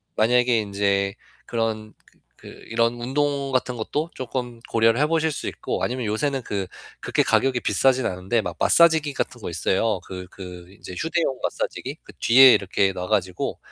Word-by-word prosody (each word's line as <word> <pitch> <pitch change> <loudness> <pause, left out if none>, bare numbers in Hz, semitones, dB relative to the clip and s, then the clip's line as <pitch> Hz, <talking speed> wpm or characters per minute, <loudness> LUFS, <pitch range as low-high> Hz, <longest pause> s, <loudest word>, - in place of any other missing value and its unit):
만약에 120 +1 +3
인제 100 0 0 0.3
그런 110 -2 -2
그 - - -27 0.2
그 - - -15 0.2
이런 115 +1 0
운동 140 +1 -1
같은 125 -1 0
것도 150 +9 -3
쪼끔 125 -2 -5
고려를 115 +2 +3
해 150 - +3
보실 160 -1 +1
수 - - -5
있고 - - -4
아니면 125 -1 -2
요새는 130 +5 -1
그 100 -3 -3 0.3
그렇게 - - +1
가격이 130 -3 +2
비싸진 130 +5 +2
않은데 95 +5 -1
막 - - -6
마사지기 160 -3 +4
같은 125 -2 -4
거 - - -5
있어요. 95 +4 0
그 90 0 -8
그 90 -2 -10
인제 90 - -11
휴대용 160 -4 -1
마사지기. - - -3
그 - - -14
뒤에 130 +2 +8
이렇게 95 0 +1
놔 90 0 -5
가지고 95 -4 -1
115 Hz, 345 characters per minute, -23 LUFS, 100-130 Hz, 0.3 s, 뒤에